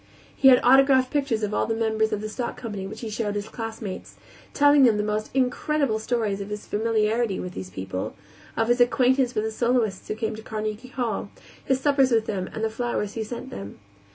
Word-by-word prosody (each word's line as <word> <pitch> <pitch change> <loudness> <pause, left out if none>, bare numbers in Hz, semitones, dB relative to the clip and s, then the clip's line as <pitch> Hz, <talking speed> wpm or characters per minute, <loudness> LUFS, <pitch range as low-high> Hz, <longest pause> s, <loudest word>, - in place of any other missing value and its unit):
He 270 - +4
had 255 -2 +8
autographed 260 0 +5
pictures 275 -7 0
of 210 0 -1
all - - +1
the 225 - 0
members 220 -1 +1
of 210 - -2
the 215 - -3
stock 240 +2 -4
company 205 -5 -5
which 220 +3 -9
he 225 - -4
showed 210 -1 -2
his 205 +1 -3
classmates, 225 -3 -6 0.4
telling 290 0 +5
them 235 -5 +5
the 210 - 0
most 210 0 -2
incredible 265 -1 +1
stories 220 -3 -1
of 200 - -6
his 210 0 -6
familiarity 220 0 0
with 180 0 -5
these 95 0 -7
people, 95 0 -5 0.4
of 225 - +2
his 240 +1 +3
acquaintance 250 +1 +3
with 215 - +1
the 220 - -2
soloists 230 -4 0
who 215 - -3
came 220 0 -3
to 220 - -9
Carnegie 215 +2 -4
Hall, 240 -6 -3 0.3
his 265 -1 +1
suppers 275 -2 +3
with 225 -2 +3
them 190 -4 -3
and 220 - -5
the 225 - +1
flowers 225 -3 -2
he 225 - -3
sent 235 +2 -7
them. 100 +1 -8
225 Hz, 210 wpm, -25 LUFS, 210-250 Hz, 0.4 s, had